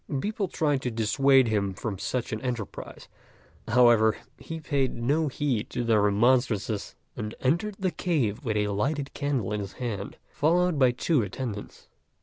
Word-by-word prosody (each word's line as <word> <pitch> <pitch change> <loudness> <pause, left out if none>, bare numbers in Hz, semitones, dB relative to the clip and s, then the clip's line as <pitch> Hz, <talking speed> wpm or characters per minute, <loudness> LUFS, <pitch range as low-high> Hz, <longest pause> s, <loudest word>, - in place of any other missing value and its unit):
People 210 - -2
tried 145 -6 0
to 125 - -1
dissuade 125 +4 +3
him 100 -3 0
from 100 -3 -4
such 125 0 -2
an 110 - -3
enterprise; 120 -5 -5 0.6
however, 115 -2 +5 0.2
he 165 0 -6
paid 140 -4 -1
no 145 +7 +1
heed 130 -5 -1
to 125 - -2
their 115 -3 +3
remonstrances, 110 0 +1 0.2
and 105 0 -5
entered 175 +10 0
the 190 -2 -1
cave 145 - -1
with 110 -4 -1
a 105 0 +1
lighted 135 +8 -1
candle 135 -9 -1
in 105 - -1
his 100 -1 -6
hand, 105 -6 -5
followed 170 +1 +1
by 130 -2 +6
two 125 +4 +1
attendants. 105 0 -6
125 Hz, 155 wpm, -27 LUFS, 105-145 Hz, 0.6 s, by